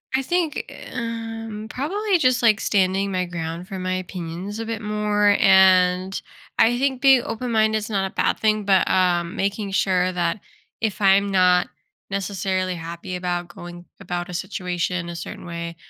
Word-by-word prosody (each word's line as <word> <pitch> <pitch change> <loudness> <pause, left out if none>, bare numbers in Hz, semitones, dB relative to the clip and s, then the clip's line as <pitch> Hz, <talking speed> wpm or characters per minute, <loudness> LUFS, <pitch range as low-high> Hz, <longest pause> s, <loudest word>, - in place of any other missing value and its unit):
I 265 - +2
think, 340 +2 -2 0.2
um, 225 -2 -5
probably 385 +8 0
just, 255 -5 +2
like, 220 -3 +4
standing 195 0 +1
my 185 -1 0
ground 170 0 -5
for 190 - -6
my 185 0 -2
opinions 185 +3 -6
a 225 - -3
bit 225 -1 -4
more, 210 -1 +2
and 185 -1 +4 0.4
I 240 +2 +4
think 265 -2 0
being 270 -3 +6
open-minded 220 -2 0
is 215 +1 -5
not 195 -2 0
a - - -20
bad - - +1
thing, 215 -1 +1
but, 195 -1 +3
um, 175 -2 +1
making 200 +1 -2
sure 185 -1 +1
that 175 +2 -1 0.4
if 215 -1 -2
I'm 195 +1 +5
not 180 -1 +4 0.4
necessarily 190 -1 -2
happy 170 +2 -6
about 175 -1 -3
going 175 0 -10
about 175 -2 -4
a 180 - -7
situation 180 -1 -3
a 170 - -6
certain - - -8
way, 170 -1 -6
195 Hz, 160 wpm, -22 LUFS, 180-220 Hz, 0.4 s, being